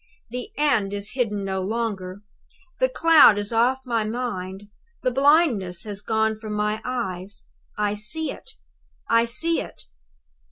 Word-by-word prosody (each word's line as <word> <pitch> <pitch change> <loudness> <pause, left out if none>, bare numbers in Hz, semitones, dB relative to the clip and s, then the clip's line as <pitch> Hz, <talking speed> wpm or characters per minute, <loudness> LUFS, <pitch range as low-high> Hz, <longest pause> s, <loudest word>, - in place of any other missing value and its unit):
The 250 0 -5
end 220 -10 +1
is 200 0 -4
hidden 210 -6 -1
no 190 -1 -2
longer. 200 -2 -3 0.6
The - - +3
cloud 330 - +6
is 205 +2 -3
off 250 +3 +2
my 230 -3 0
mind, 205 -4 -4 0.4
the 255 - +1
blindness 255 - +2
has 205 -2 -7
gone 220 0 0
from 215 -1 -6
my 210 +1 -1
eyes. 200 -6 -5 0.3
I 210 -1 0
see 235 +10 +1
it! - - -12 0.5
I 230 0 +4
see 330 +8 +2
it! - - -11
220 Hz, 145 wpm, -23 LUFS, 200-250 Hz, 0.6 s, cloud